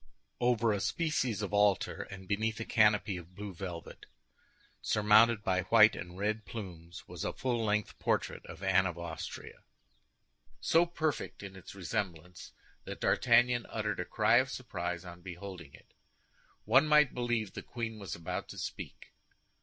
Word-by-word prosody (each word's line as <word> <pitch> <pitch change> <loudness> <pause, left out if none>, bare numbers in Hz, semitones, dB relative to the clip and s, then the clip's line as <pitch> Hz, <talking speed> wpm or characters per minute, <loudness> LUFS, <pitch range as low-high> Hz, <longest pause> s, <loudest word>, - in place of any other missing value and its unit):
Over 120 -2 +2
a 100 - -1
species 125 - 0
of 100 - -4
altar, 100 -1 +2
and 95 -1 -10
beneath 110 +3 -1
a 115 - -3
canopy 105 -3 +3
of 90 +1 -12
blue 100 0 -6
velvet, 85 -1 -8 0.7
surmounted 105 +1 +4
by 95 -1 +1
white 110 +1 +6
and 90 +1 -8
red 105 +2 -1
plumes, 85 -7 -9
was - - -6
a - - -2
full 120 -3 -1
length 105 0 -1
portrait - - -1
of 85 +3 -10
Anne 95 0 +4
of 85 -2 -5
Austria, 85 -1 -7 1.0
so 170 +2 +3
perfect 155 -9 -3
in 95 -1 -8
its 95 +1 -11
resemblance 90 -3 -4 0.3
that - - -7
D'Artagnan 120 0 +3
uttered - - -2
a - - -2
cry - - +3
of - - +3
surprise 85 0 -4
on 90 0 -10
beholding 90 -4 -9
it. - - -21 0.7
One 130 +8 +5
might 150 -3 +5
believe 120 -4 -1
the - - -6
queen 115 -2 -5
was 100 -3 -5
about 85 - -5
to - - -9
speak. - - -7
105 Hz, 155 wpm, -32 LUFS, 90-115 Hz, 1.0 s, white